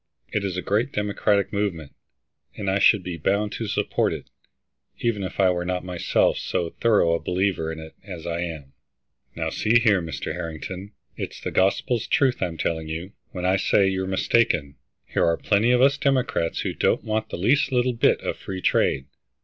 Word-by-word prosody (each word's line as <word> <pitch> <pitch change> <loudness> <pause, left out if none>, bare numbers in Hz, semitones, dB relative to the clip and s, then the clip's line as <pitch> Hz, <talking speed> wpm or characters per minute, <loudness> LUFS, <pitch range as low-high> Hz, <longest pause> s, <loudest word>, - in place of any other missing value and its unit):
It 105 - -1
is 95 -2 -2
a 90 - -3
great 110 +7 0
Democratic 105 0 0
movement, 90 -8 -2 0.6
and 100 -2 -1
I 100 - +1
should 100 -1 +5
be 90 -2 -5
bound 100 +6 0
to 115 - -4
support 100 - 0
it, - - -8 0.7
even 115 -4 0
if 95 - -6
I 95 -1 +5
were 90 -1 -1
not 90 0 -2
myself 90 -2 +1
so 85 -2 -2
thorough 105 -7 +4
a 85 - +1
believer 90 -3 -1
in 80 - -6
it 80 0 -10
as 90 -5 -8
I 85 0 -2
am." 80 -6 -6 0.6
"Now - - -2
see 115 +2 +3
here, 105 -5 +3
Mr. 80 -1 -4
Harrington, 90 +5 -6 0.2
it's - - -5
the - - -4
gospel 100 +5 +2
truth 130 +3 +1
I'm 85 -3 -2
telling 80 0 -2
you, 80 +5 -5 0.2
when 90 -1 -4
I 95 +1 +3
say 100 +1 +3
you're 95 0 -1
mistaken. 95 -6 +1 0.3
Here - - 0
are 85 0 +2
plenty 105 +3 +2
of 125 +1 +4
us 140 +1 +4
Democrats 130 -11 0
who - - -2
don't - - +1
want 110 0 -2
the - - -5
least 130 - +2
little 125 0 +2
bit 115 - +2
of - - -3
free 95 -1 -6
trade. 65 - +2
95 Hz, 190 wpm, -24 LUFS, 85-105 Hz, 0.7 s, should